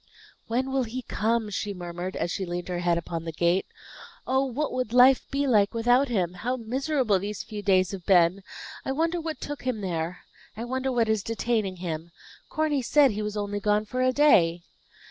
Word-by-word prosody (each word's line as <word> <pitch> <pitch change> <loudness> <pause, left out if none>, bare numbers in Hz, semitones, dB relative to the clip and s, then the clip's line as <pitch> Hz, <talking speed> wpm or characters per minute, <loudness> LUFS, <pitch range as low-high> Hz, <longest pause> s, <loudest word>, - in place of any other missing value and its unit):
"When 255 +3 -1
will 270 0 +1
he 250 +3 -5
come 230 +1 0
home?" 210 - -7
she 205 +1 -3
murmured, 175 +1 -5
as 175 - -2
she 195 - -2
leaned 175 0 -4
her 175 -1 -2
head 175 -1 +1
upon 165 -1 -4
the 165 - -4
gate. 170 +3 +1 0.6
"Oh, 265 +1 +2
what 275 +4 -2
would 250 -3 -2
life 250 +1 +6
be 280 +1 0
like 215 -4 +3
without 245 +4 +3
him? 185 -8 -1
How 245 +8 -2
miserable 255 -2 0
these 205 +2 -5
few 210 -2 -7
days 190 -2 +3
have 190 -3 -8
been! 180 0 +4 0.4
I 265 - -2
wonder 330 +4 0
what 320 -1 -5
took 290 0 -6
him 250 -4 -2
there! 175 -2 -3 0.4
I 225 - -4
wonder 260 +2 -2
what 235 -3 +2
is 220 -2 +1
detaining 225 -2 -1
him! 170 -2 -5 0.4
Corny 305 -3 0
said 275 +1 +4
he 210 +1 -3
was 210 0 -3
only 205 0 -2
gone 210 +1 +1
for 255 +4 -3
a 255 0 +3
day." 175 - +4
215 Hz, 205 wpm, -26 LUFS, 185-255 Hz, 0.6 s, life